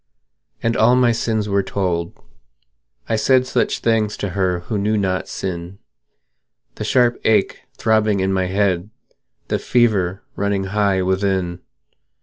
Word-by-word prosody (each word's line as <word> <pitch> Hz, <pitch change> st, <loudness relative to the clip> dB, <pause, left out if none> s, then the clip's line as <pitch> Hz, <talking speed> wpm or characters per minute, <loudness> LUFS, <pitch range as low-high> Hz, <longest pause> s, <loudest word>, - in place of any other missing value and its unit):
And 115 Hz, 0 st, +1 dB
all 120 Hz, +3 st, +4 dB
my 125 Hz, -1 st, +4 dB
sins 110 Hz, -2 st, -1 dB
were 100 Hz, -1 st, +2 dB
told; 90 Hz, -3 st, -3 dB, 0.9 s
I 115 Hz, -, 0 dB
said 130 Hz, +3 st, +3 dB
Such -, -, 0 dB
things 110 Hz, -2 st, +1 dB
to 100 Hz, -, -3 dB
her 90 Hz, -2 st, -1 dB
who 105 Hz, +4 st, -3 dB
knew 105 Hz, +2 st, +1 dB
not 95 Hz, -2 st, -1 dB
sin 90 Hz, 0 st, -5 dB, 1.0 s
The -, -, -6 dB
sharp 120 Hz, +1 st, +2 dB
ache 110 Hz, -, +2 dB, 0.2 s
throbbing 110 Hz, -2 st, +2 dB
in 95 Hz, 0 st, 0 dB
my 95 Hz, -1 st, 0 dB
head, 95 Hz, -1 st, 0 dB, 0.6 s
The -, -, 0 dB
fever 105 Hz, -6 st, +1 dB
running 100 Hz, -1 st, -1 dB
high 100 Hz, -3 st, +2 dB
within. 95 Hz, -2 st, 0 dB
100 Hz, 135 wpm, -20 LUFS, 95-110 Hz, 1.0 s, all